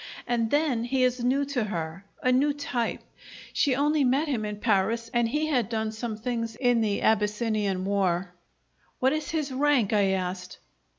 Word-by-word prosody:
And 235 -2 0
then 285 -5 +1
he 260 +1 +1
is 250 -1 +1
new 270 +3 +2
to 265 -5 -1
her 170 -2 -4 0.2
a 255 - +3
new 280 +3 +3
type. 250 -5 -2 0.5
She 275 -4 +2
only 295 +2 +2
met 270 +5 +2
him 240 -7 -1
in 210 0 -3
Paris, 225 +2 0
and 240 -1 +2
he 300 +4 0
had 255 -9 0
done 220 -1 -1
some 220 0 -5
things 230 0 -3
in 245 -3 +2
the 210 -2 0
Abyssinian 210 -3 +1
war 190 -2 0 0.3
" - - -40
"What 260 +2 +3
is 310 -1 -3
his 305 -4 -2
rank?" 260 -5 +2
I 205 -2 +4
asked. 180 -1 -4
235 Hz, 180 wpm, -27 LUFS, 210-265 Hz, 0.5 s, I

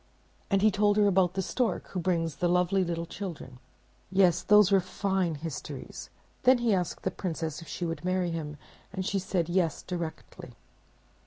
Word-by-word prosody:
And 195 -1 +2
he 215 - +6
told 205 +1 +2
her 210 - +5
about 190 -2 +3
the 190 - 0
stork 245 +5 -1
who 185 - -3
brings 165 -4 -1
the 175 - +1
lovely 180 +2 +2
little 170 -1 -3
children. 165 -9 -7 0.5
Yes, 185 -3 +4
those 210 -1 +5
were 195 - +6
fine 185 -2 -1
histories! 155 -1 -7 0.3
Then 255 0 +6
he 235 -3 +1
asked 180 -3 -2
the - - 0
Princess 165 -3 -4
if 165 - -11
she 175 - -4
would 165 -3 -4
marry 185 -1 0
him, 150 -3 -5 0.3
and 190 -1 -4
she 195 - 0
said, 180 -3 -1
"Yes," 175 -3 0
directly. 170 -3 -6
180 Hz, 175 wpm, -29 LUFS, 165-195 Hz, 0.5 s, he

